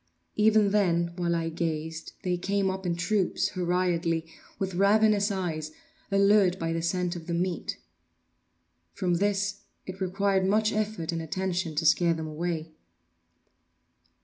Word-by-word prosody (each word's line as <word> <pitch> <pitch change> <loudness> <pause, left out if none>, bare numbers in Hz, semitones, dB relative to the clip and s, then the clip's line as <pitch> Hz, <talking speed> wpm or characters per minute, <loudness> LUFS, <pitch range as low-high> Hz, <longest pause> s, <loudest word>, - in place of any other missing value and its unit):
Even 215 -1 +4
then, 170 -4 +2
while 175 -1 0
I 165 -1 -1
gazed, 160 -1 -4
they 180 -1 0
came 195 +2 0
up 190 -1 -5
in 170 - 0
troops, 190 +1 0
hurriedly, 175 -3 0 0.3
with 190 -1 -3
ravenous 205 +2 +4
eyes, 170 -6 -3 0.4
allured 200 -2 +4
by 165 -2 -2
the 165 - -1
scent 180 +1 -1
of 165 -1 -8
the 170 - -1
meat. 180 +1 -2 1.2
From 180 -3 0
this 205 +1 0 0.3
it 190 +1 -8
required 190 +1 +1
much 215 +2 +2
effort 210 -6 -2
and 165 -1 -3
attention 180 -1 -2
to 160 +2 0
scare 170 +1 +4
them 160 0 -4
away. 160 +1 -3
180 Hz, 140 wpm, -28 LUFS, 170-200 Hz, 1.2 s, Even